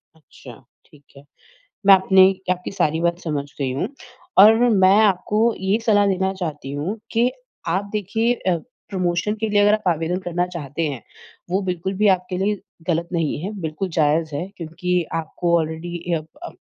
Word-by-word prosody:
अच्छा, 145 -5 -14 0.3
ठीक 145 -2 -21
है। 140 - -14 0.6
मैं 200 - +10
अपनी 190 0 +5 0.3
आपकी 180 0 -2
सारी 160 -2 +1
बात 170 0 0
समझ 150 -4 -2 0.2
गई 135 -2 0
हूँ 140 +10 -2 0.5
और 215 +2 +8 0.3
मैं 190 +2 +6
आपको 210 0 +2 0.2
ये 190 +3 +1
सलाह 205 -2 +4
देना 190 0 0
चाहती 155 -7 -5
हूँ 160 +10 -3
कि 235 +2 +2 0.4
आप 200 +2 -2
देखिए 220 +3 0
अ, 185 -7 0 0.3
प्रमोशन 185 +1 -1
के 220 - 0
लिए 205 -1 +3
अगर 205 +1 +5
आप 215 -3 -1
आवेदन 165 +1 0
करना 175 0 -1
चाहते 165 -4 -5
हैं, 135 -5 -6 0.5
वो 190 +2 +1
बिल्कुल 180 +2 -2
भी 210 - +5
आपके 180 0 -6
लिए 205 +1 0 0.3
ग़लत 170 0 0
नहीं 165 -5 -1
है, 195 - -3
बिल्कुल 160 +3 -3
जायज़ 155 0 +1
है। 145 +6 -3
क्योंकि 175 +2 -2 0.2
आपको 170 +2 0
ऑलरेडी 165 +2 -4
यप 155 -2 -1 0.2
अप - - -9
180 Hz, 170 wpm, -21 LUFS, 160-195 Hz, 0.6 s, मैं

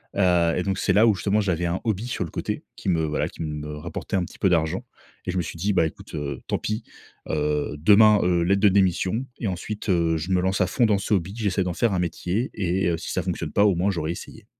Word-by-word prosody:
Heu, 90 -3 +3
et 90 - 0
donc, 95 -1 -1
c'est - - +1
là 110 +3 +5
où 105 - +4
justement 100 +3 +1
j'avais 90 -3 0
un 85 +2 -1
hobby 110 0 -1
sur 105 - -2
le 80 - -10
côté, - - -4
qui - - -4
me, 80 -2 +2
voilà, 75 0 -1
qui - - -11
me, 75 -1 -5
rapportait 75 - -5
un 90 - 0
petit - - -14
peu 95 - +3
d'argent 85 +7 0 0.4
et 90 - -1
je 95 - -3
me - - +2
suis 85 0 -6
dit: 100 +5 0
«Bah 85 - +3
écoute, 80 - -8
heu, 70 -3 -4
tant - - 0
pis, 110 +2 -3 0.5
heu, 75 -1 -1
demain, 105 +5 +6
heu, 90 -1 +2
lettre 100 +3 +2
de 105 - +6
démission 95 +4 +1
et 115 - -2
ensuite, 100 +4 -5
heu, 85 -3 +2
je 85 +5 -4
me 90 -1 +3
lance 95 +2 0
à 90 - +3
fond 120 +5 +2
dans 105 -2 +3
ce 100 +2 -1
hobby. 95 +1 0
J'essaie 100 -4 0
d'en 90 -1 -2
faire 110 +2 +1
un 90 - 0
métier 90 +7 -2
et 95 -1 0
heu, 85 - 0
si 80 - -6
ça - - 0
fonctionne - - -3
pas 100 - +4
au 100 - +4
moins 90 +4 +1
j'aurais 85 -3 -2
essayé». 85 - -9
90 Hz, 265 wpm, -24 LUFS, 85-100 Hz, 0.5 s, demain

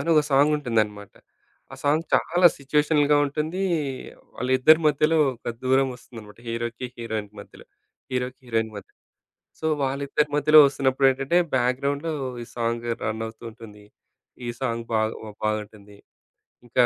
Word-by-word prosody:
అని 170 - -1
ఒక 155 - +5
సాంగుంటుందనమాట. 120 -8 +1 0.6
ఆ - - -6
సాంగ్ 155 +3 +2
చాలా 175 +1 +4
సిచ్యుయేషనల్‌గా 150 +1 +2
ఉంటుంది. 155 +5 -3 0.8
వాళ్ళిద్దరి 130 +6 +4
మధ్యలో 155 +2 +2 0.2
ఒక 120 - -6
దూరమోస్తుందన్నమాట 125 -5 -2
హీరోకి, 120 +2 -4
హీరోయిన్‌కి 110 -3 -5
మధ్యలో. - - -15 0.5
హీరోకి 125 0 -3
హీరోయిన్ 115 -2 -1
మధ్యలో. 100 - -12 0.6
సో, 160 - -2 0.2
వాళ్ళిద్దరి 140 +2 0
మధ్యలో 155 +1 +6
వస్తున్నప్పుడేంటంటే 135 +2 +1 0.2
బ్యాక్‌గ్రౌండ్‌లో 140 +5 0 0.3
ఈ - - -6
సాంగు 115 0 -2
రన్ 110 +1 -2
అవుతూ 110 0 -12
ఉంటుంది. 105 -2 -14 0.6
ఈ - - -3
సాంగ్ 115 -3 -2
బాగు 110 0 -2
బాగుంటుంది. 105 -1 -4 0.7
ఇంకా 125 +1 +3
130 Hz, 120 wpm, -24 LUFS, 115-145 Hz, 0.8 s, మధ్యలో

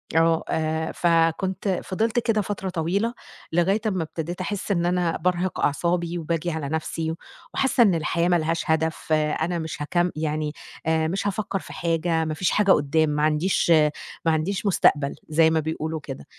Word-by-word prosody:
آه، 165 0 +3
آآ، 160 0 -1
فكنت 175 +3 +1
فضلت 220 +5 0
كده 225 -2 +1
فترة 195 -1 -4
طويلة، 185 +7 -1 0.4
لغاية 180 +6 +2
أمَّا 185 -5 0
ابتديت 165 +3 -5
أحس 205 +2 -3
إن 175 -3 +1
أنا 175 -1 +1
بارهق 180 0 -1
أعصابي 170 +3 0
وباجي 170 +1 -2
على 155 -3 -3
نفْسِي، 160 +1 -2 0.4
وحاسَّة 265 -2 +3
إن 195 -6 +4
الحياة 170 +1 0
مالهاش 165 -1 +1
هدف، 160 0 0
أنا 155 +3 0
مش 160 -2 -5
هاكم 175 +4 +1
يعني 155 -1 -2 0.3
آآ، 160 0 +2
مش 195 +4 -2
هافكر 200 -1 -2
في - - -11
حاجة، 165 -1 0
ما 155 - -2
فيش 180 +3 0
حاجة 205 -2 +3
قدام، 150 +1 +3
ما 150 0 0
عنديش 155 +5 +1 0.6
ما 165 - +4
عنديش 175 +6 -1
مستقبل، 150 -7 +3
زي 160 +1 +4
ما 160 0 +2
بيقولوا 160 +1 -3
كده. 135 - -8
165 Hz, 165 wpm, -24 LUFS, 160-185 Hz, 0.6 s, إن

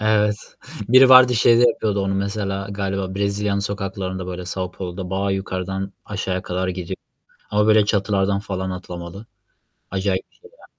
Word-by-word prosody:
Evet, 105 -1 +2 0.5
biri 130 +2 +7
vardı, 130 -1 +8
şeyde 115 +1 +5
yapıyordu 105 -3 -1
onu 95 0 -1
mesela, 100 0 -2
galiba 95 -1 -3
Brezilya'nın 100 0 0
sokaklarında, 95 -2 -4
böyle, 90 0 -5
São 90 +1 -4
Paulo'da 90 0 -6
bayağı 100 +1 -1
yukarıdan 95 0 -3
aşağıya 95 -2 -3
kadar 95 0 -2
gidiyor 90 0 -4 0.6
ama, 105 +1 +2
böyle, 110 -1 +5
çatılardan 100 -1 +1
falan 95 -2 -4
atlamalı. 90 +2 -8 0.7
Acayip 95 0 -1
bir - - -32
şey 455 - -18
ya. - - -16
100 Hz, 150 wpm, -21 LUFS, 95-105 Hz, 0.7 s, vardı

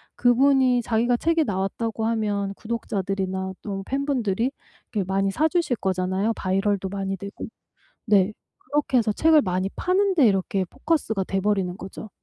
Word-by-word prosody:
그분이 255 0 +4
자기가 235 +2 +1
"책에 330 +2 +2
나왔다."고 220 +2 -2
하면 205 -3 -1
구독자들이나 190 -4 -3
또 195 -2 -5
팬분들이 260 -4 0 0.4
이렇게 205 -3 0
많이 195 0 +1
사 310 +9 +2
주실 330 -7 0
거잖아요 190 +3 0
바이럴도 195 0 0
많이 195 -1 -3
되고. 200 +2 -7 0.6
네. 205 -1 +3 0.3
그렇게 290 -3 0
해서 220 -2 +2
책을 315 +6 +5
많이 185 +1 -1
파는 380 +1 +1
데 285 -6 +5
이렇게 195 -1 0
포커스가 245 - -1
돼 195 - -1
버리는 195 -3 0
거죠. 195 +2 -9
210 Hz, 350 characters per minute, -24 LUFS, 195-250 Hz, 0.6 s, 책을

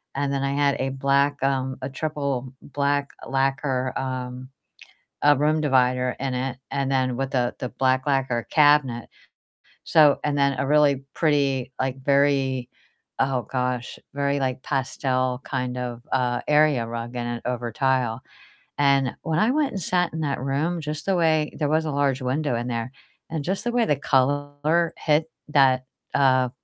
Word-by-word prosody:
and 140 0 -1
then 135 0 -1
I 140 0 0
had 145 -1 +2
a 135 - 0
black, 140 +1 +1
um 130 -1 0
a 130 - -4
triple 140 -3 -3
black 140 0 -1 0.2
lacquer, 135 -1 0
um, 130 -1 -5 0.7
uh, 145 0 +6
room 155 +2 +2
divider 125 -3 +2
in 135 -1 -2
it, 125 0 -2
and 135 -1 -1
then 130 -2 +1
with 135 +1 -3
a 120 -1 0
the 125 - -3
black 130 0 +1
lacquer 130 -4 0
cabinet. 145 -6 +3 0.8
So 150 -3 +5
and 145 -1 0
then 140 -1 +2
a 135 - -1
really 145 -2 +3
pretty, 140 -5 +1
like, 130 0 -2
very 135 -3 +2 0.5
oh 135 -1 +1
gosh, 125 -1 -2 0.2
very, 140 0 0
like, 130 -1 -2
pastel 130 -2 -1
kind 125 -2 -3
of, 120 -1 -4
uh, 125 -2 +1
area 150 -5 +3
rug 115 +1 -6
in 120 -1 -3
it 120 0 -4
over 120 -1 -3
tile. 130 -4 0 0.6
And 140 -2 +3
when 160 0 0
I 220 +3 +3
went 295 0 +1
and 195 - -4
sat 180 +1 0
in 160 - -4
that 140 -4 -2
room, 150 +6 -1
just 150 0 -5
the 195 - +1
way 160 -3 +2
there 150 -2 0
was 160 +1 +1
a 155 - -2
large 135 -1 +1
window 130 +1 -1
in 120 +1 -3
there, 115 0 -3 0.4
and 160 -2 -3
just 190 +5 -2
the 240 - 0
way 240 -1 +3
the 150 - +2
color 145 +4 +1
hit 155 +1 +1 0.2
that, 130 -3 +4 0.3
uh, 130 -2 +3
135 Hz, 170 wpm, -24 LUFS, 130-145 Hz, 0.8 s, uh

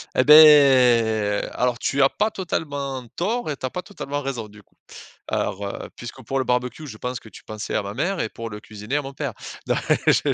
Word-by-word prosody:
Et 130 - +4
beh, 125 -9 +6
alors, 125 -1 0
tu 140 0 +1
as 135 - +5
pas 215 - 0
totalement 145 - -4
tort 215 +1 -2
et 145 - -3
tu - - -5
as 130 - -3
pas 180 - -4
totalement 145 -8 -6
raison, 130 -5 -4
du 105 0 -16
coup. - - -35 0.5
Alors, 100 +2 -2
heu, - - -7
puisque 120 +2 -9
pour 135 +5 -2
le 130 - -1
barbecue, 125 +5 -2
je 110 - -9
pense 125 +2 -4
que 110 - -15
tu - - -14
pensais 110 -1 -6
à - - 0
ma 100 0 -6
mère 175 - -2
et - - 0
pour 115 +1 -7
le 105 0 -8
cuisinier 105 +6 -6
à - - 0
mon 135 0 -8
père. 140 -4 -4 0.3
Non, - - +1 0.3
je - - +3
130 Hz, 225 wpm, -23 LUFS, 110-145 Hz, 0.5 s, beh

